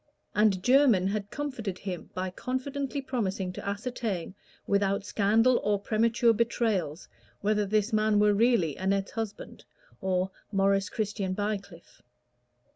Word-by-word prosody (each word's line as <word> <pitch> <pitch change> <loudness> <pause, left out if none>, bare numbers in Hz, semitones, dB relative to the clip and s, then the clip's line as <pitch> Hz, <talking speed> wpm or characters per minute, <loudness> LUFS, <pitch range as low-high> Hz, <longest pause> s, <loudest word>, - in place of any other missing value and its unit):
And 205 -3 +3
Jermyn 245 -8 +5
had 205 0 -3
comforted 235 -10 -4
him 185 -3 -6
by 185 0 -2
confidently 275 +5 -3
promising 195 -8 -2
to - - -7
ascertain, 205 -3 -3 0.3
without 200 0 +1
scandal 225 +5 +3
or 205 -1 +1
premature 230 +3 +2
betrayals, 215 -8 -1 0.3
whether 210 0 +1
this 215 +2 +1
man 215 0 +3
were 210 0 +4
really 205 - +2
Annette's 195 +1 0
husband, 225 -2 -6 0.4
or 185 0 0 0.2
Maurice 195 -1 +2
Christian 200 -3 -2
Bycliffe. 200 -4 -5
205 Hz, 120 wpm, -28 LUFS, 195-230 Hz, 0.4 s, Jermyn